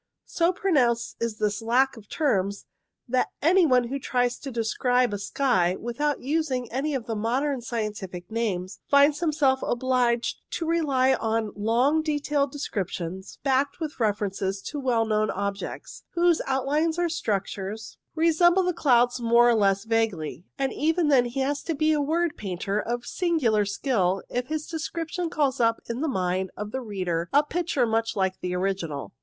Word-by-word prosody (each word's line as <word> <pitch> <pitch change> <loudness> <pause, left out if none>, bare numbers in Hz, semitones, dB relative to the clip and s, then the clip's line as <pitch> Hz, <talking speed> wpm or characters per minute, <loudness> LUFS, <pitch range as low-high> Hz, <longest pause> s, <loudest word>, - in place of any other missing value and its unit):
So 340 +1 +1
pronounced 260 -11 +1
is 230 -2 -2
this 210 +1 -1
lack 255 +4 +2
of 210 -3 -14
terms, 200 - 0 0.4
that 255 +1 +1
any 345 +3 +4
one 250 -3 +4
who 275 +2 -3
tries 245 -2 0
to 275 - -6
describe 245 0 +1
a 205 - -3
sky 190 -7 +1
without 285 +5 -2
using 270 -4 -1
any 275 +4 -1
of 245 -4 -3
the 225 - -3
modern 255 +5 0
scientific 210 -6 -5
names, 200 -5 -2
finds 285 +1 +5
himself 295 -5 +2
obliged 245 -1 +1 0.2
to 330 - -2
rely 280 -6 +2
on 225 -2 -1
long 240 +9 +2
detailed 290 -2 0
descriptions, 190 - -5
backed 275 +2 +1
with 310 -4 -5
references 200 -3 -1
to 295 - -5
well 240 -4 +1
known 215 -1 +1
objects, 200 0 -4
whose 345 -1 +3
outlines 295 +5 0
or 350 0 +1
structures 205 - -3 0.2
resemble 345 +3 +4
the 360 - +1
6 345 - -4
INTRODUCTORY - - -13
clouds 245 -3 +4
more 235 +1 +5
or - - +5
less 200 -2 +2
vaguely; 220 -8 -1
and 270 -1 -1
even 320 +1 +1
then 260 -4 +5
he 245 +3 -3
has 285 +2 -1
to 330 - -3
be 310 +2 +2
a 300 - +1
word 325 +3 0
painter 195 +1 -2
of 240 +2 -3
singular 255 - +1
skill 195 -3 0
if 245 0 -2
his 310 0 -3
description 330 +1 -4
calls 280 -4 0
up 230 -1 +2
in 235 +3 -3
the 320 - 0
mind 185 -6 -1
of 210 0 -5
the 265 - -3
reader 180 -6 -3
a 290 +1 +5
picture 315 -4 0
much 225 0 0
like 190 -2 0
the 180 0 -3
original. 180 -6 -3
245 Hz, 170 wpm, -26 LUFS, 210-295 Hz, 0.4 s, finds